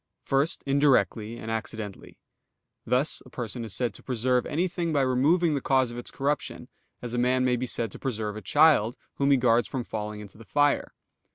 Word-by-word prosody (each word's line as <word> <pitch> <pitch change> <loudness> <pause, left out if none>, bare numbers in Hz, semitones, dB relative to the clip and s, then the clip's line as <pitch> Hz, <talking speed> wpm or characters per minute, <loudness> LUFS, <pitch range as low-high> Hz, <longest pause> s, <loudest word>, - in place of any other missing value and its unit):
First, 140 +6 0
indirectly, 125 -6 +2
and 110 -1 -6
accidentally; 110 -2 -5 0.7
thus 130 +5 +1
a 125 - -15
person 120 -1 -5
is 110 -4 -5
said 120 0 -1
to - - -12
preserve 125 0 0
anything 170 +1 -1
by 145 -3 +2
removing 150 +6 +3
the 140 - -1
cause 130 -2 +2
of 120 - -8
its 120 - -5
corruption, 145 +1 -3 0.3
as 120 -1 -5
a 120 - 0
man 130 +1 +2
may 125 -1 +3
be 125 +1 -3
said 115 -3 -2
to - - -10
preserve 110 -5 -3
a 110 - -6
child, 135 - +4 0.2
whom 140 0 +2
he 140 - +5
guards 120 -1 +3
from 130 -3 -3
falling 105 -2 -5
into 105 0 -12
the - - -11
fire. 145 +6 +1
125 Hz, 195 wpm, -27 LUFS, 115-140 Hz, 0.7 s, he